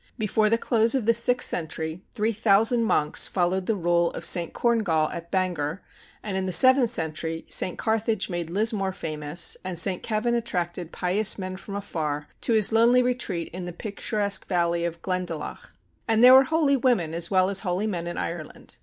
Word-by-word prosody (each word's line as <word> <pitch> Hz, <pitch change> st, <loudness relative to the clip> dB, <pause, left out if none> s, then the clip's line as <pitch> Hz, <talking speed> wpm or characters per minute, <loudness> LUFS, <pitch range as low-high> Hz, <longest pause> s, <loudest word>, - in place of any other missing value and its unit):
Before 215 Hz, -1 st, +1 dB
the 230 Hz, -, +2 dB
close 230 Hz, +1 st, +1 dB
of 255 Hz, -5 st, -1 dB
the 230 Hz, -, +4 dB
sixth 245 Hz, +2 st, +2 dB
century, 160 Hz, 0 st, -4 dB
3,000 220 Hz, +1 st, +2 dB
monks 150 Hz, -8 st, +1 dB
followed 185 Hz, 0 st, -1 dB
the 225 Hz, -, +1 dB
rule 170 Hz, -2 st, +1 dB
of -, -, -6 dB
St. 170 Hz, -2 st, +3 dB
Corngall 200 Hz, -10 st, 0 dB
at 170 Hz, -1 st, -8 dB
Bangor; 180 Hz, -3 st, -2 dB, 0.4 s
and 205 Hz, -3 st, -4 dB
in 190 Hz, 0 st, -2 dB
the -, -, -2 dB
seventh 260 Hz, +4 st, +6 dB
century, 160 Hz, -4 st, -2 dB
St. 180 Hz, -, 0 dB
Carthage 220 Hz, -2 st, -1 dB
made 175 Hz, -2 st, -4 dB
Lismore 200 Hz, 0 st, -1 dB
famous 155 Hz, 0 st, -2 dB
and 185 Hz, -2 st, -4 dB
St. 180 Hz, +2 st, +2 dB
Kevin 225 Hz, +2 st, -1 dB
attracted 180 Hz, -7 st, -3 dB
pious 195 Hz, +4 st, 0 dB
men 185 Hz, -1 st, -5 dB
from 200 Hz, +1 st, -9 dB
afar 150 Hz, -7 st, -4 dB
to 235 Hz, -, +1 dB
his 215 Hz, -1 st, +3 dB
lonely 235 Hz, +3 st, +4 dB
retreat 240 Hz, -9 st, -3 dB
in 180 Hz, 0 st, -6 dB
the 175 Hz, -, -7 dB
picturesque 205 Hz, +1 st, -2 dB
valley 170 Hz, -1 st, 0 dB
of 170 Hz, 0 st, -6 dB
Glendalough. 180 Hz, -4 st, -5 dB, 0.4 s
And 225 Hz, 0 st, +2 dB
there 250 Hz, +1 st, +9 dB
were 265 Hz, +1 st, +7 dB
holy 300 Hz, -1 st, +2 dB
women 235 Hz, -11 st, +1 dB
as 170 Hz, 0 st, -1 dB
well 185 Hz, 0 st, +2 dB
as 195 Hz, -, +3 dB
holy 185 Hz, +1 st, -1 dB
men 175 Hz, -5 st, -3 dB
in 175 Hz, -, -5 dB
Ireland. 165 Hz, -3 st, -7 dB
190 Hz, 180 wpm, -25 LUFS, 170-225 Hz, 0.4 s, there